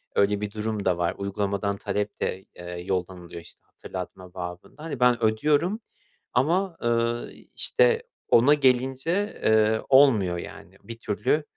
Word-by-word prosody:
öyle 100 0 +2
bir 105 -1 -3
durum 105 -1 -3
da 90 -2 +2
var 85 -1 -1
uygulamadan 100 0 -2
talep 105 0 -3
de, 95 +1 -2
eee, 90 0 -7
yollanılıyor, 90 -2 -4
işte, - - -17
hatırlatma 90 -1 -9
babında. 90 - -8
Hani, 155 -6 -5
ben 125 -2 +3
ödüyorum 150 - +2 0.5
ama, 170 +8 +1
eee, 120 0 -1
işte, 475 -1 +2 0.3
ona 125 +5 +6
gelince, 135 - +1
eee, 110 0 +3
olmuyor, 120 -10 +5
yani. - - -10
Bir 115 0 -9
türlü, 110 +8 0
110 Hz, 135 wpm, -25 LUFS, 95-135 Hz, 0.5 s, ona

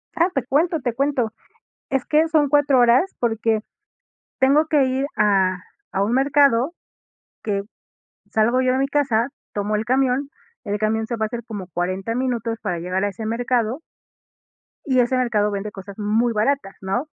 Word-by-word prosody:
Ah, 340 +2 +3
te 270 - 0
cuento, 315 +5 +1
te 245 -4 -2
cuento. 265 -4 0 0.6
Es 270 -2 -1
que 310 +2 +3
son 310 -2 +3
4 285 -2 +3
horas, 245 +10 +4
porque 225 -2 0 0.8
tengo 280 +4 +4
que 300 -3 +3
ir 260 +2 0
a 190 -3 +3 0.4
a 195 +1 +1
un 220 - -1
mercado, 275 0 +3 0.7
que 200 -2 -1 0.7
salgo 235 +4 +2
yo 255 0 +2
de 260 - +1
mi 275 - +1
casa, 260 -5 +1 0.3
tomo 205 +1 -1
el 215 +1 -1
camión, 265 +2 +1 0.3
el 205 -2 -3
camión 220 +1 0
se 235 - -3
va 220 -1 -1
a - - -2
hacer 235 +1 -6
como 205 -5 -7
40 185 +5 -3
minutos 240 -3 -1
para 175 - -2
llegar 180 +3 -2
a 205 - +1
ese 215 +3 -6
mercado 240 +3 -1 1.0
y 260 -3 +2
ese 250 +1 +2
mercado 215 -5 +1
vende 200 +1 -4
cosas 195 -1 -10
muy 220 +3 +1
baratas, 220 -1 0
¿no? 215 +10 -2
235 Hz, 170 wpm, -22 LUFS, 210-270 Hz, 1.0 s, horas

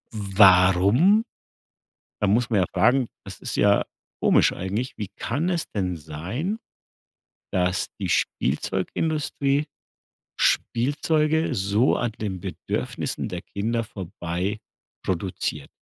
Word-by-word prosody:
Warum? 100 - +5 1.0
Da 105 - +2
muss 115 +4 +2
man 110 -4 +2
ja 90 - +2
fragen 120 +7 +3 0.2
das - - -9
ist - - -4
ja 100 0 +4 0.4
komisch - - +5
eigentlich. 110 +8 -3
Wie 105 -3 -5
kann 145 +9 -1
es 170 -3 0
denn 90 -4 -1
sein, 90 - -4 0.9
dass 90 0 +1
die - - -3
Spielzeugindustrie 140 - 0 0.7
Spielzeuge 155 +5 +1
so 100 +6 +2
an 120 -2 -1
den 100 -4 -3
Bedürfnissen - - -3
der - - -5
Kinder 115 +3 -2
vorbei 95 -1 -4 0.5
produziert? 90 -5 -2
105 Hz, 105 wpm, -24 LUFS, 95-135 Hz, 1.0 s, Warum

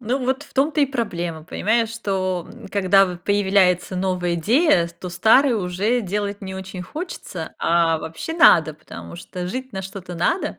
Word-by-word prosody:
Ну 245 +3 -1
вот 265 +2 0
в 295 - -18
том-то 295 +3 +1
и 285 - +4
проблема 175 - -3
понимаешь? 220 +6 0
Что, 190 -5 -2
м, - - -12
когда 195 0 +4
в 180 -1 -6
появляется 190 -1 +2
новая 180 -2 -1
идея, 210 - +3
то 170 +2 -9
старый 225 +9 +4
уже 205 +4 0
делать 205 0 -3
не 190 -1 -6
очень 190 -1 -7
хочется, 185 - -7
а 165 -1 +2
вообще 160 - -6
надо, 165 - +6
потому 155 +2 -11
что 180 +1 -6
жить 255 +6 -5
на 190 - -4
что-то 190 -2 -8
надо 175 - -1
190 Hz, 170 wpm, -22 LUFS, 175-230 Hz, -, надо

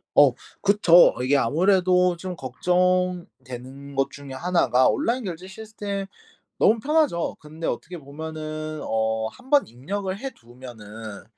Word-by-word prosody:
어 140 -4 +7 0.3
그쵸. 195 -4 +6
이게 140 +3 +3
아무래도 180 +5 +3
좀 180 +1 -6
걱정되는 140 -4 -2
것 135 0 +1
중에 140 -2 -10
1 175 +6 +1
가 130 +1 +5
온라인 255 -3 0
결제 180 -2 -6
시스템 205 -1 -5 0.5
너무 225 - +4
편하죠. 290 - +1
근데 155 +2 -7
어떻게 175 +1 -4
보면은 155 +1 -6
어 110 0 0
1 255 +1 -17
번 290 -1 +5
입력을 185 - -4
해 270 +6 -5
두면은 115 - -11
165 Hz, 255 characters per minute, -24 LUFS, 130-190 Hz, 0.5 s, 어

